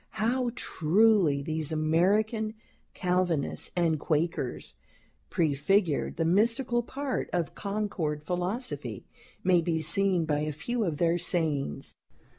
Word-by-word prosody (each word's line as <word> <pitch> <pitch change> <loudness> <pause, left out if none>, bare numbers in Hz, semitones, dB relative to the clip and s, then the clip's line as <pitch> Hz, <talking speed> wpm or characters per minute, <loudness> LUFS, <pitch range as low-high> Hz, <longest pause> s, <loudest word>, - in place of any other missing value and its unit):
How 245 +3 +1
truly 175 - +3
these 155 0 -2
American 205 +8 +1 0.4
Calvinists 180 -5 0
and 165 -3 +1
Quakers 155 -4 -2 0.6
prefigured 160 +2 +1
the 165 - +1
mystical 230 +7 +2
part 270 +3 -3
of 175 -2 -1
Concord 200 -8 -3
philosophy, 180 +9 -3 0.4
may 180 -2 +4
be 165 -1 0
seen 180 +1 +3
by 150 -2 0
a 150 0 -1
few 230 +11 -2
of 160 -5 -2
their 170 +1 +2
sayings. 155 - -1
175 Hz, 110 wpm, -28 LUFS, 155-215 Hz, 0.6 s, may